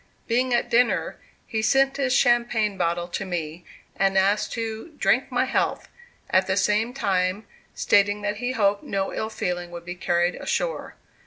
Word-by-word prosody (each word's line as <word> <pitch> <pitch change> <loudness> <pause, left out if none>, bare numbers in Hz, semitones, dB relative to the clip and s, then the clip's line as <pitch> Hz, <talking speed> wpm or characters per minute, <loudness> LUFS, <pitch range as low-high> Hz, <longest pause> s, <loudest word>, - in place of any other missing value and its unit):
Being 250 +2 +1
at 240 0 +1
dinner, 240 0 +2 0.3
he 220 -2 -2
sent 270 +4 +3
his 270 -2 0
champagne 240 -5 +2
bottle 175 -1 -1
to 185 - -3
me, 175 -2 -5 0.3
and 195 0 +1
asked 200 +2 +2
to 225 +7 -5
"drink - - +1
my - - +1
health," - - -1 0.4
at 185 0 +3
the 190 0 0
same 215 +4 +2
time 195 -4 -1 0.3
stating 205 0 +2
that 205 0 -2
he 245 +2 -2
hoped 200 -3 +2
no 195 -1 -3
ill 220 - -3
feeling 175 -5 -3
would 170 0 -9
be 175 - -5
carried 175 0 0
ashore. - - -3
205 Hz, 165 wpm, -24 LUFS, 185-235 Hz, 0.4 s, sent